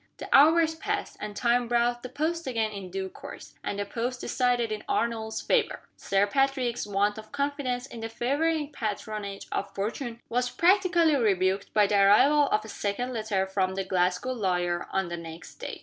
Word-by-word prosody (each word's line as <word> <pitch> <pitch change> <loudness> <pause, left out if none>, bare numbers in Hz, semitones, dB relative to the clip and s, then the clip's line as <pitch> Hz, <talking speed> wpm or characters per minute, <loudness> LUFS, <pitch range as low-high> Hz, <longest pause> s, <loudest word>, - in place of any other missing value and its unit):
The - - -7
hours 320 +3 +6
passed, 320 - -3
and 210 -1 -6
time 240 +2 +2
brought 240 0 +1
the 255 - -7
post 315 +4 -2
again 225 -4 0
in 195 -3 -7
due 190 +1 -3
course - - -11
and 200 - -3
the 205 - -2
post 245 +4 -3
decided 245 -2 0
in 215 0 -4
Arnold's 225 -1 -1
favor! 460 -3 +1
Sir 195 +1 +1
Patrick's 260 -1 0
want 205 +1 +1
of 215 - -12
confidence 280 -3 -2
in 240 - -10
the 225 0 -4
favoring 290 +6 0
patronage 210 -3 -4
of 200 0 -3
Fortune 230 +4 -3
was 245 +1 0
practically 345 -2 +3
rebuked 195 -5 +1
by 210 -1 +6
the 200 0 +3
arrival 280 +9 +5
of 215 0 +1
a - - -8
second 220 +5 -3
letter 215 -4 -1
from 190 -1 -1
the 195 - -1
Glasgow 180 +5 0
lawyer 180 -6 -1
on 190 -2 -1
the 175 - -4
next 165 0 -10
day. - - -6
230 Hz, 180 wpm, -27 LUFS, 200-265 Hz, -, hours